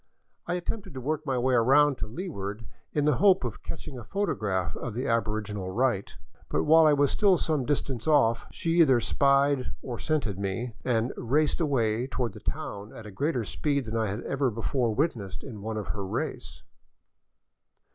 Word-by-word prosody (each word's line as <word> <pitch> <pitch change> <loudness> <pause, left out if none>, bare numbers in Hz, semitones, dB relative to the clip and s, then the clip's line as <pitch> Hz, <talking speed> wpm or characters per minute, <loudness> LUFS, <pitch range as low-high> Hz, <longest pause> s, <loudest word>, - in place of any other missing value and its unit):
I 175 - 0
attempted 190 -1 -5
to - - -4
work 155 +4 -2
my 135 -1 +1
way 130 +1 +2
around 135 +3 +4
to - - -3
leeward 110 - -5 0.3
in 145 -1 0
the 150 -4 +3
hope 190 -4 +5
of 120 -4 -4
catching 135 -5 -7
a - - -8
photograph 105 - -1
of 120 -4 -5
the 125 +3 -2
aboriginal 105 -4 -1
rite. 115 -1 0 0.3
But - - +1
while 160 +1 +6
I 150 - +5
was 145 -1 +3
still 200 -4 +4
some 155 -5 0
distance 135 -4 -1
off, 115 -7 +3
she 170 -1 -1
either 135 -6 +5
spied 140 +2 +2
or 120 -3 -5
scented 140 - -1
me, 100 +5 -3
and 120 0 0
raced 145 +7 +1
away 120 -5 +1
toward 125 -5 -2
the 105 - -10
town 105 -5 -5
at 115 - -10
a 105 - -8
greater 135 +3 -1
speed 140 +6 -1
than 110 0 -4
I 110 -1 +1
had 100 +3 -3
ever 135 -1 0
before 115 +2 -1
wit 155 +7 +2
nessed 100 -5 -8
in 110 -7 -8
one 110 +1 -4
of 105 - -5
her 100 -2 -3
race. 95 - -4
125 Hz, 185 wpm, -28 LUFS, 110-150 Hz, 0.3 s, while